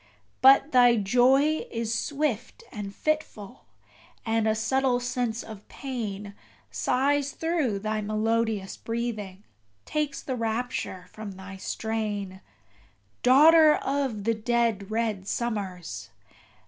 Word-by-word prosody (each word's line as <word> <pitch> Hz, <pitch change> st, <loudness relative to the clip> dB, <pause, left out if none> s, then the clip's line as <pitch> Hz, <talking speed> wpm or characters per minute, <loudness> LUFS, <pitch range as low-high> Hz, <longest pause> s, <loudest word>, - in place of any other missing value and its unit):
But 275 Hz, +3 st, +6 dB
thy 245 Hz, -2 st, +6 dB
joy 255 Hz, +8 st, +3 dB
is 230 Hz, -1 st, -2 dB
swift 290 Hz, -, -2 dB
and 205 Hz, -3 st, -6 dB
fitful; 250 Hz, -4 st, -3 dB, 0.6 s
and 225 Hz, -1 st, +1 dB
a 220 Hz, -, +2 dB
subtle 255 Hz, +3 st, +1 dB
sense 245 Hz, -2 st, -2 dB
of 215 Hz, -2 st, -11 dB
pain 210 Hz, -7 st, -5 dB, 0.4 s
Sighs 280 Hz, +2 st, +1 dB
through 320 Hz, -10 st, 0 dB
thy 215 Hz, +1 st, -2 dB
melodious 215 Hz, -1 st, -1 dB
breathing, 215 Hz, -4 st, -4 dB, 0.4 s
takes 300 Hz, -2 st, -2 dB
the 260 Hz, -, -3 dB
rapture 225 Hz, -5 st, -3 dB
from 215 Hz, -2 st, -8 dB
thy 190 Hz, +1 st, -10 dB
strain, 205 Hz, -2 st, -3 dB, 0.8 s
Daughter 305 Hz, +4 st, +7 dB
of 270 Hz, -7 st, -2 dB
the 230 Hz, +2 st, +2 dB
dead 225 Hz, -3 st, 0 dB
red 215 Hz, -3 st, -2 dB
summers! 185 Hz, -, -4 dB
230 Hz, 110 wpm, -27 LUFS, 205-260 Hz, 0.8 s, Daughter